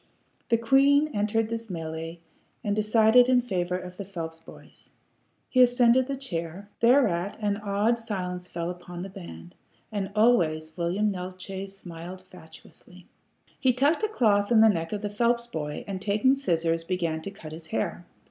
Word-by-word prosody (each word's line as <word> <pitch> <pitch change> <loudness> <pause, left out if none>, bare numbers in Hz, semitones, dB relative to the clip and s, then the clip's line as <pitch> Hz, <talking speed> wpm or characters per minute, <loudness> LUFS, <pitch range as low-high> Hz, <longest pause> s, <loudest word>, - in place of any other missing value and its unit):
The 230 - +4
queen 275 +5 +4
entered 215 +1 0
this 230 0 -4
mêlée, 165 -2 -5 0.5
and 205 -2 0
decided 220 +3 +5
in 255 -1 +5
favor 180 -7 -1
of 180 0 -9
the 200 - -4
Phelps 165 -4 -7
boy. 165 - -15 0.8
He 255 - +3
ascended 245 0 +5
the 275 - -2
chair. 180 -6 -5
Thereat 225 -7 +3
an 205 -2 0
awed 210 +3 0
silence 180 -5 -4
fell 170 0 -4
upon 175 0 -8
the 195 - -7
band. 85 - -10 0.4
And 200 -2 -3
always 160 -9 +2
William 185 +5 0
Neeltje 185 +1 -6
smiled 180 -1 -9
fatuously. 180 +1 -15 0.5
He 260 -2 +3
tucked 285 - +2
a 435 - +2
cloth 210 - +2
in 225 -2 +6
the 220 - +7
neck 165 -5 -1
of 210 -1 -4
the - - 0
Phelps 235 +2 +1
boy, 150 -10 -5
and 190 -2 -5
taking 215 +6 +3
scissors, 165 -11 0
began 165 -2 -2
to 195 - -6
cut 165 -6 -11
his 160 0 -8
hair. 110 -8 -3
195 Hz, 165 wpm, -27 LUFS, 170-230 Hz, 0.8 s, the